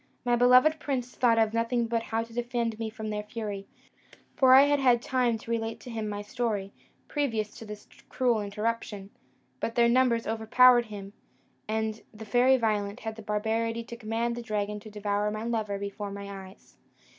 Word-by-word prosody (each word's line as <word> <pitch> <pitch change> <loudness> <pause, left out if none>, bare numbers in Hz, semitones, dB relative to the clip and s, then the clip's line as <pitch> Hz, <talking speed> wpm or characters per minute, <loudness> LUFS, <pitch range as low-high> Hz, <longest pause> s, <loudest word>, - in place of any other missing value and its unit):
My 240 0 +3
beloved 255 +6 +5
prince 255 -4 -3
thought 235 -2 +3
of 220 -1 +2
nothing 230 +1 +1
but 230 0 -1
how 225 0 -2
to 230 0 -13
defend 235 -2 -2
me 225 -1 -2
from 215 0 -6
their 210 0 -2
fury; 210 -2 -6 0.7
for 260 -1 +6
I 270 - +9
had 290 0 +3
had 250 -3 +4
time 245 -2 0
to 230 - -8
relate 225 -1 -2
to 245 - -9
him 220 -2 -3
my 205 0 -4
story, 210 -4 -3 0.3
previous 225 -8 -2
to 225 - -9
this 210 0 -9 0.2
cruel 245 -4 +1
interruption; 210 -1 -3 0.5
but 230 - -3
their 235 -1 +5
numbers 235 -1 +3
overpowered 240 +2 +5
him, 200 -2 -9 0.5
and 220 0 -2
the 220 0 -10
Fairy 250 +4 +4
Violent 210 -3 -1
had 220 0 -5
the 225 - -9
barbarity 225 +2 -1
to 235 +1 -9
command 230 +1 -2
the 240 - -5
dragon 210 -2 -3
to 215 +1 -11
devour 205 0 -1
my 215 +1 -4
lover 220 -3 -2
before 200 +1 -5
my 200 -1 -7
eyes. 190 - -21
225 Hz, 185 wpm, -28 LUFS, 210-240 Hz, 0.7 s, I